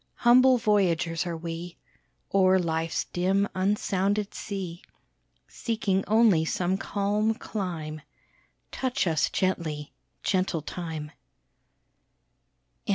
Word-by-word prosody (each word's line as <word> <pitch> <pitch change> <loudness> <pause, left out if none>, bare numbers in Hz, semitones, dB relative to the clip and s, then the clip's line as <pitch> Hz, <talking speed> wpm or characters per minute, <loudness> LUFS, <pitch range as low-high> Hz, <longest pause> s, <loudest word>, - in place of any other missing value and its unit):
Humble 255 +1 +6
voyagers 180 -6 +1
are 170 -1 -3
we, 170 +1 -6 0.6
O'er 190 -1 +5
life's 165 -2 -1
dim 190 +3 +1
unsounded 200 +1 0
sea, 185 -4 -5 0.7
Seeking 200 -5 -1
only 215 -6 +5
some 180 +3 0
calm 205 +3 0
clime; 170 -9 -5 0.7
Touch 260 -2 -1
us 160 -3 +1
gently, 155 -6 -2 0.3
gentle 185 -5 0
Time! 160 -3 -5
185 Hz, 90 wpm, -27 LUFS, 165-205 Hz, 0.7 s, Humble